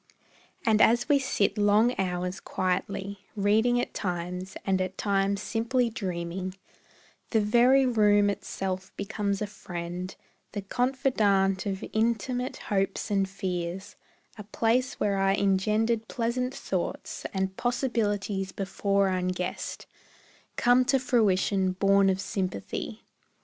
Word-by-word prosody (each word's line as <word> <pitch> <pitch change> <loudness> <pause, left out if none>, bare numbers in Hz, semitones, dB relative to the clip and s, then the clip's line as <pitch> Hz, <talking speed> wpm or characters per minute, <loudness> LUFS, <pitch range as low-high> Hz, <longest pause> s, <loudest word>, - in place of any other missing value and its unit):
And 220 -1 +4
as 235 +1 +4
we 290 -2 +4
sit 225 -5 0
long 210 +4 +4
hours 180 0 -2
quietly, 195 +2 -2 0.2
Reading 220 +4 +3
at - - -3
times, 180 0 -4
and 190 -1 +1
at 185 0 -3
times 200 -1 0
simply 235 +2 0
dreaming, 185 -2 -4 0.7
The 225 - +3
very 245 +6 +5
room 210 -4 +4
itself 190 -1 -3
becomes 200 0 -2
a - - 0
friend, 180 -2 -6 0.4
The 205 -1 -4
confidant 210 -5 +1
of 195 -1 -3
intimate 235 +3 0
hopes 195 +1 -1
and 195 -1 +1
fears; 185 0 -4 0.4
A - - -5
place 230 +5 0
where 200 -1 +1
are 195 0 +3
engendered 215 +3 +1
pleasant 250 +2 -2
thoughts, - - -3
And 190 -1 -2
possibilities 210 -6 -1
before 200 0 0
unguessed 180 -1 -3 0.7
Come 245 +1 +4
to 270 - +3
fruition 200 -6 +2
born 195 +1 +4
of 190 0 +1
sympathy. 185 - -4
200 Hz, 120 wpm, -28 LUFS, 190-225 Hz, 0.7 s, very